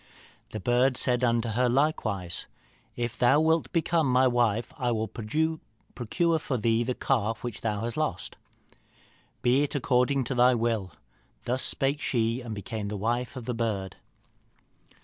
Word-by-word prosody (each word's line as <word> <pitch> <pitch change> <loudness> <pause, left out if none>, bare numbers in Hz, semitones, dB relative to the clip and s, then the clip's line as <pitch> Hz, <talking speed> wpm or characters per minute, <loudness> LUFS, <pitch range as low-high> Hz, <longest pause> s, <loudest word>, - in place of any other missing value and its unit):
The 110 - -5
bird 125 +5 +2
said 125 -1 +2
unto 115 -1 +1
her 125 +3 +1
likewise, 110 - 0 0.5
'If 120 -1 -4
thou 130 +4 +5
wilt 160 +1 +2
become 165 -4 +1
my 130 +1 +4
wife, 120 -2 +1
I 125 -2 0
will 110 -1 -1
procure 155 +4 -2
for 135 -3 -2
thee 115 +1 +1
the 125 +1 -2
calf 115 -4 -1
which 120 -3 -5
thou 105 -2 -1
hast 120 +3 -4
lost.' 125 - -2 1.1
'Be 125 +3 +4
it 145 - -1
according 130 0 +2
to 125 - -3
thy 125 0 +5
will.' 115 -5 -1 0.5
Thus 125 +2 -1
spake 140 +2 0
she, 115 0 0
and 115 -3 -6
became 105 0 -5
the 105 0 -4
wife 120 +5 -2
of 125 -3 -7
the 125 - -2
bird. 105 -5 -3
120 Hz, 155 wpm, -27 LUFS, 110-130 Hz, 1.1 s, thou